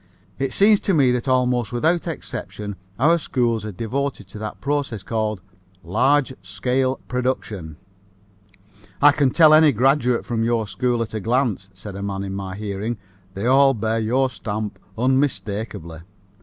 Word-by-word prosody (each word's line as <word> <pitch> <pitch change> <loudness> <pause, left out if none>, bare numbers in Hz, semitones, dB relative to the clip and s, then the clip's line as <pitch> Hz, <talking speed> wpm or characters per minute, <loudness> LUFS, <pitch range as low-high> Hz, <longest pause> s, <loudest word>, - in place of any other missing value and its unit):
It 135 0 -1
seems 205 +1 +5
to 195 - 0
me 135 -5 +4
that 125 +2 -1
almost 125 -3 +1
without 160 +9 +1
exception 105 -9 -6 0.2
our 165 +7 +4
schools 120 -7 0
are 105 - -4
devoted 115 +2 -3
to 105 - -9
that 110 0 -6
process 140 -8 -2
called 110 -2 -2 0.4
"large 130 +9 +2
scale 125 +8 0
production." 110 - -3 1.2
"I 145 +1 +7
can 145 -2 +2
tell 155 +3 +6
any 155 -1 +7
graduate 125 0 +2
of 115 -1 +1
your 115 -1 +1
school 120 +2 0
at 110 - -9
a 110 - -2
glance," 115 -3 0
said 95 +1 -9
a 100 - -6
man 100 -1 -3
in 95 -1 -5
my 95 -1 -5
hearing. 105 +2 -4 0.4
"They 100 +3 -3
all 135 +1 +5
bear 110 +1 -1
your 125 +4 +1
stamp 105 -3 -5 0.2
unmistakably." 110 - -1
120 Hz, 155 wpm, -22 LUFS, 105-135 Hz, 1.2 s, I